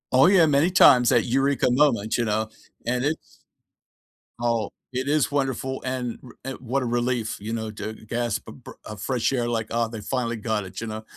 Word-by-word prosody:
Oh, 135 +6 +7
yeah, 185 -3 +6
many 150 +2 +3
times, 130 -9 +6
that 120 -3 +4
eureka 135 +2 +2
moment, 120 -6 +2
you 120 - +1
know, 110 0 0 0.4
and 125 +1 0
it's 155 +3 -3 1.0
Oh, 115 -3 0 0.2
it 130 +2 -2
is 150 -1 +2
wonderful 135 -1 -1
and 125 -2 -3
r 125 - -12
and 135 0 -5
what 130 +2 -1
a - - -2
relief, 120 -1 -1
you 110 +3 -4
know, 110 -1 -3
to 105 +1 -6
gasp 120 +2 -3
a - - -9
bre - - -12
a 105 - -7
fresh 125 +4 0
air 120 -3 0
like, 115 -2 -2
"Ah, 115 0 0
they 110 -2 -7
finally 120 +1 -2
got 110 -1 -2
it," 95 0 -10
you - - -3
know. 110 0 -6
120 Hz, 205 wpm, -24 LUFS, 110-135 Hz, 1.0 s, Oh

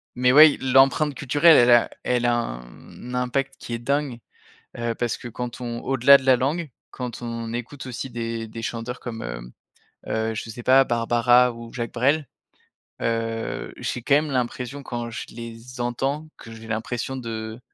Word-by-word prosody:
mais 125 0 +3
ouais, 155 0 +8
l'empreinte 135 +3 +4
culturelle, 145 +4 +5
elle 120 0 +6
a 120 -1 +5
elle 125 -1 +1
a 120 - +3
un 60 - -8
impact 135 +2 -1
qui 120 - -7
est 115 - -2
dingue, 140 -1 -1 0.6
heu, 115 -1 -1
parce 120 0 -2
que 120 - -8
quand 120 +1 -6
on 120 -1 -4
au-delà 135 +1 +6
de 130 - -10
la 130 -1 +5
langue, 150 +4 -1 0.2
quand 125 -2 -6
on 115 -1 -5
écoute 125 +3 -6
aussi 130 +1 -5
des 115 -1 -4
des 115 +1 -8
chanteurs 120 +2 -5
comme, 115 -2 -6
hem, - - -7 0.6
heu, 110 0 -1
je 115 - -5
sais 120 +2 -8
pas, 135 +2 +6
Barbara 120 +1 +3
ou 115 0 -11
Jacques 120 -2 -4
Brel, 140 +4 +1 0.8
heu, 115 0 -2
j'ai 120 - -4
quand 140 - +3
même 150 0 0
l'impression 125 +2 -3
quand 120 -2 -5
je 115 - -5
les 115 +2 -9
entends, 135 +6 -2
que 115 - -11
j'ai 115 0 -11
l'impression 115 +4 -3
de 110 -2 -6
120 Hz, 175 wpm, -24 LUFS, 115-130 Hz, 0.8 s, ouais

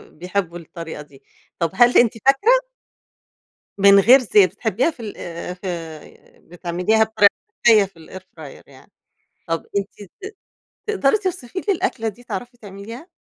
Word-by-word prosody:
بيحبوا 180 0 -3
الطريقة 165 -2 -9
دي، 140 -2 -18 0.4
طب 165 -2 0
هل 240 +5 +4
أنتِ 240 -2 +4
فاكرة 465 - +3 1.1
من 200 0 +6
غير 245 +7 +7
زيت، 205 -5 +3
بتحبيها 230 - 0
في 275 - -25
ال 215 -3 -8
آآ، 170 +1 -7
في 170 -4 -9
بتعمليها 175 +5 0
بطريقة 215 -2 +3 0.3
صحية 220 -4 +6
في 165 -5 -16
الair - - -28
fryer 160 -5 -13
يعني، - - -19 0.6
طب 165 0 -3
أنتِ 200 -1 -5
ت - - -6 0.6
تقدري 405 -6 +2
توصفي 370 - -5
لي 400 +1 0
الأكلة 360 -11 -2
دي؟ 225 +3 -7
تعرفي 245 0 -7
تعمليها؟ 220 - -11
200 Hz, 145 wpm, -20 LUFS, 175-245 Hz, 1.1 s, غير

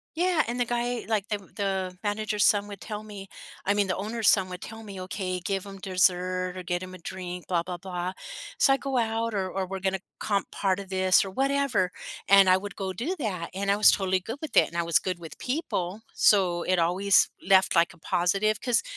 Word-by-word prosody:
Yeah, 345 -1 +2
and 240 +2 -3
the 245 - +2
guy 240 0 -2
like, 215 -2 0
the 210 -1 -1 0.2
the 190 -3 -2
manager's 210 0 0
son 205 0 +3
would 200 -2 -9
tell 210 -1 -6
me 200 -2 -10 0.4
I 200 - +3
mean, 205 -1 +1
the 185 - -1
owner's 220 +3 -2
son 190 -2 +4
would 180 0 -7
tell 225 0 -9
me, 195 -3 -8
"Okay, 185 -1 -3
give 195 +1 -3
him 195 -1 -10
dessert 185 -1 +1
or 185 - -5
get 175 0 -3
him 185 0 -9
a 185 - -10
drink," 180 0 -7
blah 170 -2 +1
blah 180 0 -5
blah, 180 0 -4 0.5
so 270 - +5
I - - +2
go 270 -1 -2
out 225 -1 0
or 190 -2 -1
or 190 0 -2
we're 190 +1 -5
gonna 190 0 -1 0.2
comp 200 -2 -1
part 195 -1 0
of 195 -1 -8
this 185 0 +3
or 190 - -6
whatever, 270 -6 +1 0.4
and 195 -1 +7
I 185 0 +6
would 200 +2 -7
go 190 -2 -4
do 260 - -3
that, 185 - -3
and 200 +1 0
I - - +3
was 210 - +7
totally 190 -1 +1
good 225 +8 -6
with 310 -1 -7
it, - - +6
and 170 - -7
I 170 - +1
was 170 0 +3
good 185 -2 -3
with 165 -2 -11
people, 220 - -3
so 180 -4 +3
it 185 +1 +1
always 180 +4 +4
left, 190 -1 +4
like, 170 +2 +4
a - - -21
positive 195 +6 0
'cause 245 -3 +2
195 Hz, 230 wpm, -27 LUFS, 185-215 Hz, 0.5 s, and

